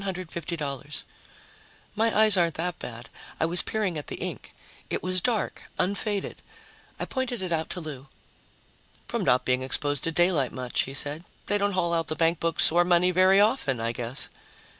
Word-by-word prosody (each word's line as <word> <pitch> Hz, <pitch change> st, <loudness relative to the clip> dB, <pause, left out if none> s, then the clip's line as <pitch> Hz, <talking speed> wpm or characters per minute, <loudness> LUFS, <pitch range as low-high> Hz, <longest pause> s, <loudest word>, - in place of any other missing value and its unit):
My 225 Hz, +1 st, +2 dB
eyes 215 Hz, -2 st, +6 dB
aren't 170 Hz, -3 st, +2 dB
that 175 Hz, +2 st, -3 dB
bad; 115 Hz, -1 st, -7 dB, 0.3 s
I -, -, +3 dB
was 170 Hz, +2 st, +5 dB
peering 200 Hz, -7 st, -1 dB
at 145 Hz, -, -9 dB
the -, -, -5 dB
ink. -, -, -6 dB, 0.4 s
It -, -, -2 dB
was 185 Hz, 0 st, +1 dB
dark, 220 Hz, +2 st, -1 dB
unfaded. 200 Hz, +1 st, -1 dB, 0.6 s
I -, -, -2 dB
pointed 250 Hz, -6 st, -3 dB
it 180 Hz, -, -4 dB
out 160 Hz, -1 st, 0 dB
to -, -, -3 dB
Lou. 145 Hz, -3 st, -8 dB, 1.0 s
"From -, -, -2 dB
not 125 Hz, -, +3 dB
being 130 Hz, 0 st, +2 dB
exposed 145 Hz, +1 st, -1 dB
to 165 Hz, -, 0 dB
daylight 165 Hz, -6 st, +2 dB
much," 125 Hz, -1 st, -1 dB
he 135 Hz, -, -7 dB
said. 145 Hz, +4 st, -1 dB, 0.2 s
"They 205 Hz, -, +1 dB
don't 200 Hz, 0 st, +1 dB
haul 170 Hz, -2 st, +1 dB
out 165 Hz, -1 st, 0 dB
the 155 Hz, -, -2 dB
bankbooks 165 Hz, 0 st, +3 dB
or 175 Hz, +2 st, +4 dB
money 175 Hz, +1 st, +4 dB
very 185 Hz, +2 st, +5 dB
often, 205 Hz, -, +2 dB
I 115 Hz, +1 st, -1 dB
guess." 120 Hz, +2 st, -2 dB
170 Hz, 170 wpm, -27 LUFS, 145-190 Hz, 1.0 s, eyes